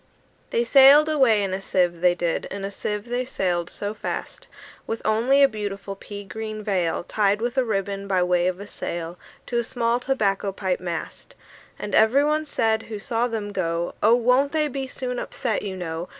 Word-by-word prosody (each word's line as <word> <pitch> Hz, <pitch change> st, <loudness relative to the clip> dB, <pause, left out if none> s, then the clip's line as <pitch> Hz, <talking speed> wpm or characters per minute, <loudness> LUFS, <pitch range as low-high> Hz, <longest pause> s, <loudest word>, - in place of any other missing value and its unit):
II. -, -, -37 dB
They 235 Hz, -, +1 dB
sailed 275 Hz, +4 st, +7 dB
away 255 Hz, -9 st, +4 dB
in 190 Hz, -1 st, -2 dB
a 190 Hz, -, -3 dB
sieve, 175 Hz, -3 st, 0 dB
they 180 Hz, -1 st, +4 dB
did, 170 Hz, -1 st, -1 dB
In 195 Hz, 0 st, -5 dB
a 200 Hz, -, -4 dB
sieve 210 Hz, +1 st, -4 dB
they 245 Hz, +1 st, -1 dB
sailed 175 Hz, -8 st, -1 dB
so 205 Hz, +1 st, -4 dB
fast, -, -, -6 dB, 0.4 s
With 225 Hz, -, -2 dB
only 240 Hz, +6 st, +4 dB
a -, -, +8 dB
beautiful 200 Hz, -4 st, -5 dB
pea 205 Hz, +1 st, -9 dB
green 215 Hz, +2 st, -6 dB
veil 185 Hz, -6 st, 0 dB
Tied 205 Hz, +2 st, +1 dB
with 240 Hz, +2 st, -2 dB
a 260 Hz, -, +3 dB
ribbon, 200 Hz, -3 st, -2 dB
by 185 Hz, -2 st, +2 dB
way 180 Hz, 0 st, +2 dB
of 185 Hz, 0 st, -2 dB
a 200 Hz, -, -7 dB
sail, 170 Hz, -3 st, -5 dB, 0.3 s
To 240 Hz, -, -1 dB
a -, -, 0 dB
small 235 Hz, 0 st, 0 dB
tobacco 205 Hz, -7 st, 0 dB
pipe 190 Hz, -1 st, -2 dB
mast. 175 Hz, -, -6 dB, 0.4 s
And 205 Hz, -1 st, -6 dB
every 230 Hz, +6 st, +5 dB
one 305 Hz, +1 st, 0 dB
said 225 Hz, -5 st, +1 dB
who 215 Hz, -, -4 dB
saw 230 Hz, +3 st, -1 dB
them 215 Hz, -3 st, -4 dB
go, 170 Hz, -3 st, -2 dB
"Oh! 225 Hz, +3 st, +6 dB
won't 250 Hz, +4 st, +2 dB
they 305 Hz, -1 st, +2 dB
be 270 Hz, -1 st, -4 dB
soon 250 Hz, -1 st, -4 dB
upset, 230 Hz, -4 st, -2 dB
you 195 Hz, -2 st, -5 dB
know? 165 Hz, 0 st, -5 dB
210 Hz, 200 wpm, -24 LUFS, 190-245 Hz, 0.4 s, a